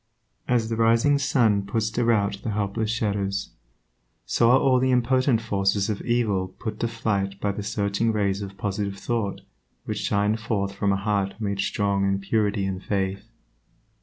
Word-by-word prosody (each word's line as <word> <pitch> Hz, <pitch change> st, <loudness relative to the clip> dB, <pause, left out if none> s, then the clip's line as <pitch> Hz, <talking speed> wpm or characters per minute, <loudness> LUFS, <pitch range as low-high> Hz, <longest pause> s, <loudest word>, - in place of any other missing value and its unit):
As 120 Hz, -3 st, +1 dB
the 115 Hz, -, -1 dB
rising 115 Hz, +6 st, +3 dB
sun 115 Hz, -7 st, +2 dB
puts 110 Hz, +2 st, -1 dB
to 120 Hz, +2 st, 0 dB
rout 100 Hz, -4 st, +1 dB
the -, -, -4 dB
helpless 105 Hz, +1 st, -1 dB
shadows, 100 Hz, -3 st, -1 dB, 0.7 s
so 115 Hz, -, +3 dB
are 125 Hz, -, +7 dB
all 130 Hz, -2 st, +3 dB
the 130 Hz, +1 st, +1 dB
impotent 125 Hz, -1 st, +2 dB
forces 100 Hz, -1 st, +1 dB
of 105 Hz, -, -4 dB
evil 110 Hz, -6 st, 0 dB
put 110 Hz, -2 st, -5 dB
to 120 Hz, -, 0 dB
flight 100 Hz, -4 st, -2 dB
by 100 Hz, -, 0 dB
the 100 Hz, -, -5 dB
searching 105 Hz, +2 st, 0 dB
rays 100 Hz, -2 st, 0 dB
of 100 Hz, -1 st, -7 dB
positive 100 Hz, 0 st, -3 dB
thought 110 Hz, -2 st, -2 dB, 0.4 s
which -, -, -3 dB
shine 105 Hz, +2 st, +1 dB
forth 100 Hz, -3 st, -2 dB
from 100 Hz, 0 st, 0 dB
a -, -, +2 dB
heart 100 Hz, -1 st, -1 dB
made 100 Hz, -2 st, -2 dB
strong 100 Hz, 0 st, 0 dB
in 100 Hz, 0 st, +1 dB
purity 105 Hz, 0 st, 0 dB
and 95 Hz, -1 st, -4 dB
faith. 95 Hz, 0 st, -2 dB
105 Hz, 170 wpm, -25 LUFS, 100-115 Hz, 0.7 s, are